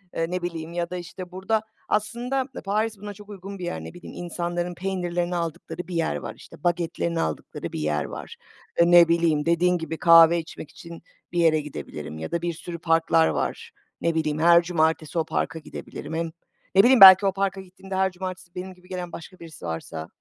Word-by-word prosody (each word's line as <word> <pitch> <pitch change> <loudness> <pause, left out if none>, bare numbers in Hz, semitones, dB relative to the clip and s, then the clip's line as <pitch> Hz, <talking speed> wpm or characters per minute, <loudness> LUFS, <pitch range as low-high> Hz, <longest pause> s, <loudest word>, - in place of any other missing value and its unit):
eee, 165 - +1
ne 180 0 -2
bileyim 170 -1 -5
ya 170 0 -2
da 180 - -4
işte 180 +1 -8
burada 190 +4 0 0.3
aslında 240 +5 -1 0.2
Paris 215 +2 0
buna 205 +1 -7
çok 205 +1 -14
uygun 195 0 -8
bir 180 - -4
yer. 175 - -4
Ne - - -9
bileyim, 175 - -11
insanların 175 +1 -3
peynirlerini 175 -1 -2
aldıkları 170 +1 -4
bir 180 - -6
yer 165 - 0
var, 70 - -7
işte - - -15
bagetlerini 170 -1 -1
aldıkları 80 -2 -4
bir - - -3
yer 75 -1 0
var. - - -8 0.4
E, 170 +1 +5
ne 175 -1 +8
bileyim, 165 -3 +2
dediğin 175 +2 +3
gibi 160 -1 -5
kahve 165 0 +7
içmek 160 -2 -9
için 170 0 -11 0.3
bir 175 - -1
yere 160 -2 +4
gidebilirim 80 - -7
ya 80 - -6
da 170 - -1
bir 170 0 -2
sürü 170 +1 -8
parklar 165 0 +3
var. - - -3 0.3
Ne 170 -1 +1
bileyim, 155 -1 0
her 170 +1 +6
cumartesi 160 -1 0
o 160 - 0
parka 160 0 -2
gidebilirim. 155 0 -8
Hem 165 0 -2 0.4
ne 195 - +8
bileyim 255 -1 +5
belki 190 +1 +11
o 195 - +2
parka 195 0 -1
gittiğimde 190 +1 -9
her 190 0 +2
cumartesi 185 -1 -7
benim 185 +1 -6
gibi 180 0 -21
gelen 180 -2 -5
başka 180 +2 -10
birisi 165 - -11
varsa 80 -1 -5
175 Hz, 200 wpm, -25 LUFS, 165-185 Hz, 0.4 s, belki